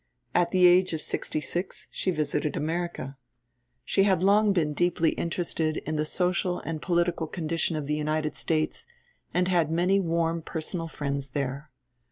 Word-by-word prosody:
At 175 - +3
the 185 -1 +4
age 180 0 +5
of 160 - -2
sixty - - -2
six 175 +6 -3
she - - -2
visited 150 -3 -1
America. 160 -4 -3 0.7
She 195 - +2
had 190 -3 +3
long 205 +2 +5
been 160 -6 +1
deeply 170 0 +2
interested 165 -2 -1
in 155 - -3
the 150 0 0
social 180 +1 0
and 160 -2 -4
political 170 -2 +1
condition 165 0 -1
of 150 -2 -3
the 150 - -1
United 155 0 -1
States, 155 - -1 0.4
and 180 0 +1
had 175 -4 +2
many 180 +4 +2
warm 165 -2 0
personal 165 +1 -4
friends 140 -3 -3
there. 140 +2 -3
165 Hz, 160 wpm, -27 LUFS, 155-180 Hz, 0.7 s, age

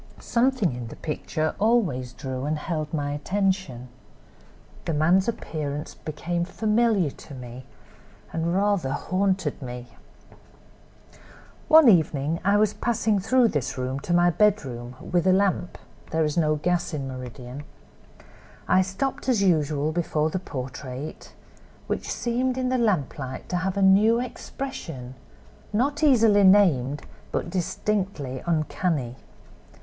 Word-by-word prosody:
Something 235 - +1
in 120 -1 -6
the - - -9
picture 155 0 -2
always 195 - +1
drew 130 +1 -5
and 155 +1 -1
held 155 -1 -3
my 145 -2 -2
attention. 185 -5 -1 1.0
The 165 - -1
man's 175 +6 +3
appearance 150 -9 -4
became 170 +3 -3
familiar 215 -3 +1
to 140 - -12
me, 125 0 -9 0.7
and 165 +2 0
rather 195 -8 +1
'haunted' 185 -2 -1
me. 125 -1 -7 1.8
"One 315 -3 +8
evening 160 -5 +3
I 200 +2 +4
was 210 -1 +3
passing 225 -3 0
through 235 +4 +3
this 135 - -2
room 130 +1 -2
to 175 - -6
my 175 0 +4
bedroom, 135 - 0
with 175 +1 0
a - - +6
lamp—there 185 -4 -1
is 150 - -2
no 155 -3 +2
gas 175 +2 -1
in 135 -2 -4
Meridian. 130 +1 -7 1.1
I 185 - +5
stopped 225 +9 -2
as 225 -6 +3
usual 155 -4 +2
before 160 -2 0
the 185 - -1
portrait, 130 -2 -7 0.5
which - - -3
seemed 250 +2 -1
in 255 -1 0
the 255 0 +1
lamplight 145 - -1
to 180 - 0
have 185 +2 -2
a 200 - +2
new 210 +5 +5
expression, 185 - -6 0.6
not 275 +8 0
easily 225 -8 +5
named, 150 -9 +4 0.3
but 170 - -2
distinctly 180 -7 -2
uncanny. 155 -5 -1
170 Hz, 125 wpm, -25 LUFS, 140-205 Hz, 1.8 s, One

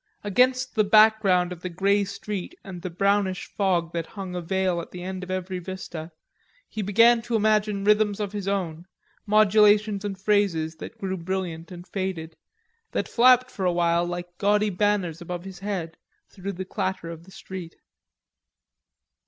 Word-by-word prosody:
Against 255 +5 +2
the 215 - +3
background 205 -4 +5
of 175 -1 -7
the 180 - -4
grey 200 +3 +2
street 200 - -5
and 185 -3 -8
the 185 - -4
brownish 195 +1 +1
fog 175 -4 0
that 165 -1 -3
hung 195 -3 -7
a 180 - -3
veil 185 0 0
at - - -10
the 180 -1 -8
end 185 0 -5
of 185 - -8
every 185 0 -3
vista 175 -3 -7 0.6
he 220 - -5
began 230 +4 +5
to 235 0 -3
imagine 210 -2 +2
rhythms 210 0 +3
of 205 -2 -2
his 205 -2 -5
own, 180 -4 -2 0.4
modulations 210 0 +4
and 195 -2 -4
phrases 190 -6 +1
that - - -9
grew 190 -1 -3
brilliant 170 -1 -4
and 175 +1 -10
faded, 180 -5 -4 0.6
that - - -1
flapped 250 +1 +5
for 195 - -5
a 180 - +3
while 170 0 +2
like 175 0 -6
gaudy 210 +1 +2
banners 180 -4 0
above 175 0 -5
his 190 -2 -9
head 190 -5 -4 0.3
through 195 +1 -6
the 190 +1 -5
clatter 185 -2 -3
of 165 0 -10
the - - -16
street. 185 -3 -8
190 Hz, 170 wpm, -25 LUFS, 175-205 Hz, 0.6 s, background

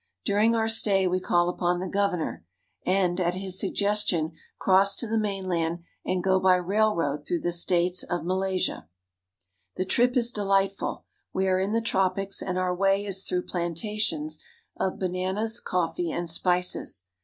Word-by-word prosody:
During 215 +3 +3
our 225 -1 +1
stay 200 -4 +4
we 180 +1 +1
call 175 -1 +2
upon 175 0 0
the 185 - -3
governor, 180 - -1 0.4
and 185 -1 +2
at 175 0 0
his 190 0 -1
suggestion 200 -5 0 0.3
cross 195 +1 +4
to 235 - -2
the 225 0 0
mainland 180 -5 -2 0.2
and 185 -1 -1
go 190 -1 +3
by 185 -1 +5
railroad 180 -6 0
through 170 +3 -2
the 175 - -1
states 175 +1 +2
of 175 -2 -3
Malaysia. 185 - -1 0.9
The 185 - -2
trip 245 +6 +2
is 240 -1 +4
delightful. 195 -2 0 0.3
We 190 0 0
are 185 0 +2
in 195 +2 -1
the 230 +1 +1
tropics, 195 -2 0
and 185 -1 -3
our 185 -1 0
way 195 +2 +1
is 195 -1 -1
through 180 0 -1
plantations 170 -3 -2 0.4
of 190 - -2
bananas, 190 +5 -1
coffee, 175 -1 -1
and 170 +1 -3
spices. 175 - +1
185 Hz, 155 wpm, -26 LUFS, 175-200 Hz, 0.9 s, by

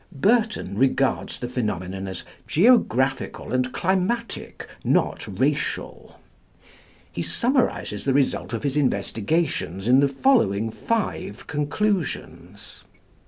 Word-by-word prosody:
Burton 210 - +1
regards 135 0 +1
the 120 - -4
phenomenon 95 -6 -3
as 95 -2 -6 0.2
"geographical 135 - +2
and 130 0 +1
climatic, 190 - -2 0.2
not - - +1
racial." - - -2 0.9
He - - -4
summarises 245 - 0
the 135 - +1
result 140 -3 +1
of 115 - -3
his 140 0 -1
investigations 110 - 0
in 130 +2 +6
the 140 - +4
following 125 - +2
five 205 - -3
conclusions. 160 +4 -3
135 Hz, 100 wpm, -24 LUFS, -, 0.9 s, in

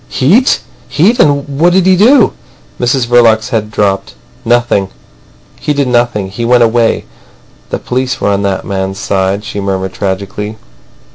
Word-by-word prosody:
"Heat! 200 - +2 0.3
Heat! 200 +10 +2
And 145 -1 +2
what 175 +2 +4
did 185 -1 +3
he 190 0 +5
do?" 235 +5 +4 0.5
Mrs 125 +1 +1
Verloc's 120 -2 +3
head 110 -4 -2
dropped. 100 -2 -1 0.3
"Nothing. 120 -5 +1 0.7
He 150 - -1
did 140 -2 0
nothing. 120 -5 0
He 115 +4 -5
went 120 0 +4
away. 115 0 +1 0.6
The - - -2
police 125 0 -3
were - - 0
on 100 0 0
that 100 -1 -2
man's 95 -1 -3
side," 100 0 -1
she 110 -2 -6
murmured 95 -1 -3
tragically. 100 +3 -4
115 Hz, 150 wpm, -12 LUFS, 100-135 Hz, 0.7 s, he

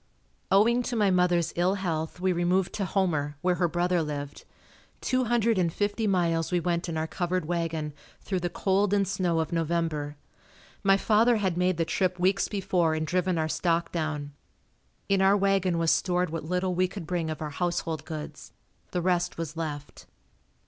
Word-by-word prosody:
Owing 230 +5 +4
to 245 - -2
my 205 -3 +3
mother's 180 -2 +2
ill 180 +3 +2
health 165 -4 -3
we 185 0 +1
removed 175 +2 +1
to 200 - -2
Homer, 155 -7 0
where 180 0 +3
her 175 - +4
brother 175 +1 +1
lived. 145 -2 -5 0.5
Two 255 0 0
hundred 230 -3 +2
and 170 -2 +1
fifty 205 +4 -1
miles 170 -4 +1
we 180 - +2
went 175 +1 -1
in 160 - -3
our 160 - 0
covered 175 +1 -2
wagon, 165 -3 -2 0.3
through 190 -2 -2
the 175 0 -2
cold 195 +2 +1
and 200 -1 +2
snow 175 -3 0
of 160 0 -2
November. 165 -3 -1 0.6
My 195 0 +4
father 225 +4 +3
had 190 -4 0
made 180 0 +1
the 165 - +1
trip 180 +1 0
weeks 190 +2 +2
before 180 -5 0
and 155 0 -1
driven 180 +1 0
our 160 -1 0
stock 170 +1 0
down. 150 -3 -3 0.7
In 195 -1 +2
our 195 +1 +5
wagon 195 -3 +2
was 165 -1 +2
stored 180 -2 +1
what 165 -2 -4
little 180 +2 0
we 185 +1 +2
could 180 -1 -8
bring 170 -1 -2
of 155 - -4
our 150 -1 -4
household 165 -1 -2
goods, 155 -1 -8 0.4
the 180 -1 -2
rest 180 -1 0
was 165 -1 -5
left. 150 -3 -6
175 Hz, 185 wpm, -27 LUFS, 160-190 Hz, 0.7 s, our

